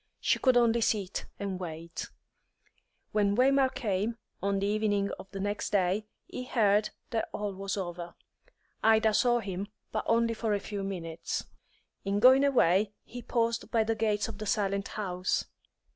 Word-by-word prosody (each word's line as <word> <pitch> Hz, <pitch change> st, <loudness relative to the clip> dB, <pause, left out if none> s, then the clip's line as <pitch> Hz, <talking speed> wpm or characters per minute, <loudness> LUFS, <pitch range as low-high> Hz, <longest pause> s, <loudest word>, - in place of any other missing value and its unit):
She -, -, +2 dB
could 255 Hz, -2 st, +4 dB
only 235 Hz, -1 st, +4 dB
sit 200 Hz, -4 st, -1 dB
and 195 Hz, -2 st, -3 dB
wait. 165 Hz, -1 st, -6 dB, 1.0 s
When 205 Hz, -1 st, +2 dB
Waymark 265 Hz, +2 st, +3 dB
came, 220 Hz, -2 st, -1 dB, 0.2 s
on 200 Hz, 0 st, +1 dB
the 195 Hz, -, 0 dB
evening 205 Hz, -1 st, +1 dB
of 195 Hz, -, -10 dB
the 195 Hz, -, -7 dB
next 205 Hz, +1 st, -2 dB
day, 200 Hz, +1 st, +1 dB, 0.2 s
he 250 Hz, -, -6 dB
heard 210 Hz, -4 st, +3 dB, 0.2 s
that 225 Hz, -2 st, -1 dB
all 205 Hz, -1 st, -3 dB
was 195 Hz, +1 st, -4 dB
over. 175 Hz, -2 st, -5 dB, 0.7 s
Ida 220 Hz, 0 st, +4 dB
saw 240 Hz, +1 st, +3 dB
him, 195 Hz, -1 st, -4 dB, 0.2 s
but -, -, -1 dB
only 230 Hz, 0 st, +3 dB
for 220 Hz, -2 st, 0 dB
a -, -, -1 dB
few 205 Hz, 0 st, -5 dB
minutes. 170 Hz, -4 st, -4 dB, 0.6 s
In 200 Hz, +1 st, 0 dB
going 260 Hz, +4 st, +7 dB
away, 210 Hz, -7 st, +3 dB
he 245 Hz, +1 st, -8 dB
paused 230 Hz, 0 st, -1 dB
by 225 Hz, -2 st, +3 dB
the 225 Hz, +1 st, 0 dB
gates 215 Hz, -2 st, 0 dB
of 215 Hz, -3 st, -8 dB
the 215 Hz, -, -5 dB
silent 200 Hz, -1 st, 0 dB
house. 185 Hz, -3 st, -2 dB
205 Hz, 160 wpm, -30 LUFS, 195-230 Hz, 1.0 s, going